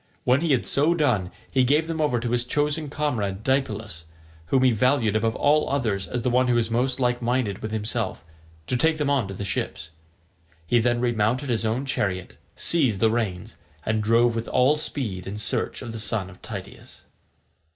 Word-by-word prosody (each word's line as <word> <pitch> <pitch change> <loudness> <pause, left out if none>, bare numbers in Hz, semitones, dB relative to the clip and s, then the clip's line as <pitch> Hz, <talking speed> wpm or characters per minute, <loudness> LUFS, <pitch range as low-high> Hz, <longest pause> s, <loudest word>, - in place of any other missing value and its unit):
When 130 +3 +3
he 165 -2 +1
had 130 -3 +2
so 155 +5 +2
done 120 - +1 0.2
he 130 -2 +3
gave 145 +5 +3
them 165 -1 -3
over 140 -5 +1
to 120 0 -3
his 120 0 +2
chosen 150 +3 -1
comrade 110 -10 -2
Deipylus, 110 - -1 0.4
whom 130 +5 +2
he 130 - +5
valued 115 -1 +2
above 110 +1 +1
all 150 +1 +2
others 110 -9 -1
as 120 +5 -3
the 125 - +1
one 125 +1 +3
who 120 - +2
was 115 -1 +1
most 125 +3 0
like 125 -1 +1
minded 120 -4 0
with 110 - -5
himself, 110 -3 -2 0.4
to 125 - -1
take 160 +5 +2
them 145 -2 0
on 130 -8 +1
to 95 - -7
the 100 - -5
ships. 80 -4 -3 0.7
He 120 +8 +3
then 120 +1 +1
remounted 120 +3 0
his 115 -2 +1
own 120 +5 -1
chariot, 95 -8 -2 0.2
seized 130 - +2
the 110 +1 +3
reins, 105 -6 -3 0.3
and 110 0 0
drove 115 +2 +3
with 115 0 -3
all 130 +4 +3
speed 110 -12 -3
in 100 +2 -5
search 105 - -2
of 120 - -6
the 115 - -6
son 105 -3 -1
of 90 - -17
Tydeus. - - -9
120 Hz, 195 wpm, -24 LUFS, 110-135 Hz, 0.7 s, he